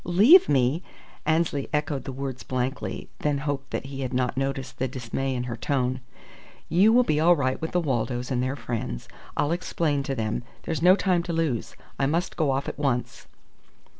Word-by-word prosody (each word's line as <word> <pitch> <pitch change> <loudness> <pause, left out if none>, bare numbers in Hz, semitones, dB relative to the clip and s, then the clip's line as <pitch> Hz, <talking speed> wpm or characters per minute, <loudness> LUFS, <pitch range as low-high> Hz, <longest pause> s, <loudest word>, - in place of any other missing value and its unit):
"Leave 220 - +7
me!" 135 +3 +2 0.5
Annesley 155 -3 +1
echoed 150 -2 -1
the - - -4
words 130 -1 -5
blankly, 130 +1 -3
then 150 -1 +1
hoped 140 -1 -3
that - - -3
he 135 0 -6
had 130 -1 -3
not 125 -1 0
noticed 135 -1 -3
the 130 - +1
dismay 130 +1 -3
in 125 - -2
her 120 -1 -4
tone. 130 +3 -1 0.7
"You 190 +7 +5
will 250 +2 +6
be 150 -10 +1
all 175 +3 +6
right 130 -3 -1
with 160 - -2
the 180 - +2
Waldos 125 -4 -1
and 125 -1 +1
their 130 +2 -1
friends. 115 - -4 0.3
I'll 145 - +1
explain 165 -4 0
to 135 0 -3
them. 110 -1 -1 0.2
There's 160 -2 -2
no 180 +2 +7
time 185 -3 +2
to 170 0 -4
lose. 160 -8 -1 0.2
I 135 - +2
must 165 +5 -1
go 155 -4 +1
off 135 +1 0
at - - -5
once." 130 -4 -1
135 Hz, 195 wpm, -26 LUFS, 130-160 Hz, 0.7 s, Leave